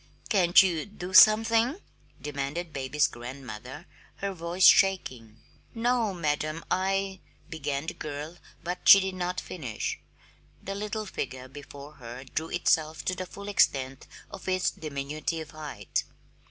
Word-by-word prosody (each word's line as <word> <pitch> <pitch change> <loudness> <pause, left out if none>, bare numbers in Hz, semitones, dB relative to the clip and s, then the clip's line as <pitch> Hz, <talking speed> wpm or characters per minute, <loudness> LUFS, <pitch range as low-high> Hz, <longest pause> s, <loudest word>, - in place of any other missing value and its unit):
"Can't 185 -4 +6
you 175 -2 -1
do 185 -3 -8
something?" 225 - +6 0.4
demanded 150 +3 -4
baby's 145 +2 +1
grandmother, 125 +3 -9 0.3
her 200 0 -3
voice 175 +1 +1
shaking. 125 - +4 0.4
"No, 235 -2 +1
madam. 155 -2 -2
I 195 0 0 0.2
" - - -31
began 145 -2 -3
the - - -4
girl, 150 +3 -6 0.3
but 180 +1 -3
she 200 - +12
did 190 0 -2
not 180 0 -2
finish. 130 -11 -5 0.6
The 195 - -4
little 210 +2 -4
figure 130 -9 -5
before 145 +1 -11
her 120 +2 -8
drew 160 +4 -4
itself 160 -3 +1
to 185 - 0
the 185 0 -5
full 200 +2 -10
extent 135 -9 +1 0.2
of 190 - -7
its 185 0 +1
diminutive 155 +2 -4
height. 150 -10 -4
165 Hz, 135 wpm, -28 LUFS, 140-190 Hz, 0.6 s, she